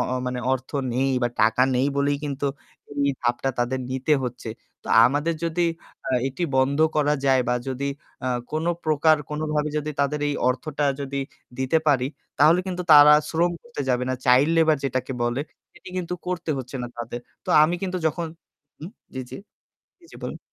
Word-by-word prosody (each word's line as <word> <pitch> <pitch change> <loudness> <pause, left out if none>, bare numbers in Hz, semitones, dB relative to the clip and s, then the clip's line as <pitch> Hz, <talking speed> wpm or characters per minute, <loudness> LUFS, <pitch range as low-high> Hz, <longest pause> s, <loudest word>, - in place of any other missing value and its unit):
অ - - +1
মানে 125 0 -2
অর্থ 130 0 -3 0.2
নেই 135 +2 +1
বা 120 - +2
টাকা 110 +3 +4
নেই 125 +2 +2
বলেই 140 0 +1
কিন্তু 140 -1 -2 0.5
এই 140 0 +1
ধাপটা 120 +2 0
তাদের 120 +2 0
নিতে 130 +4 0
হচ্ছে। 125 -2 -6 0.3
তো - - -17 0.2
আমাদের 145 +6 +1
যদি 170 +1 0 0.4
আ - - -2 0.2
এটি 135 +7 -6
বন্ধ 135 +2 +2 0.2
করা 150 0 +3
যায় 130 -2 +4
বা 125 - +2
যদি 135 +1 -3 0.4
আ - - +1 0.2
কোনপ্রকার 155 -1 +2
কোনভাবে 150 0 -1
যদি 150 +1 -3
তাদের 145 +1 0
এই 145 - -1
অর্থটা 145 +3 -2 0.2
যদি 140 0 -3 0.4
দিতে 130 +5 +2
পারি 130 -4 +3 0.3
তাহলে 165 +4 +6
কিন্তু 180 -1 -3
তারা 150 0 +9 0.2
শ্রম 170 +2 +1
করতে 240 -10 -8
যাবে 125 -1 +1
না। 130 - 0
Child 130 +5 +5
labor 160 -1 +4
যেটাকে 130 0 -2
বলে 120 +3 0 0.3
সেটি - - -14
কিন্তু 180 -1 -2
করতে 175 -2 -3
হচ্ছে 130 +1 -6
না - - -3
তাদের। 120 +1 -5 0.2
তো - - -13
আমি 170 +3 +3
কিন্তু 185 -1 -2
যখন 165 +2 -1 0.5
হুম। 165 +6 -8 0.2
জি, 130 - -3
জি। - - -7 0.6
জি, 340 - -20
জি, - - -13
বলুন। - - -5
140 Hz, 180 wpm, -24 LUFS, 130-155 Hz, 0.6 s, তারা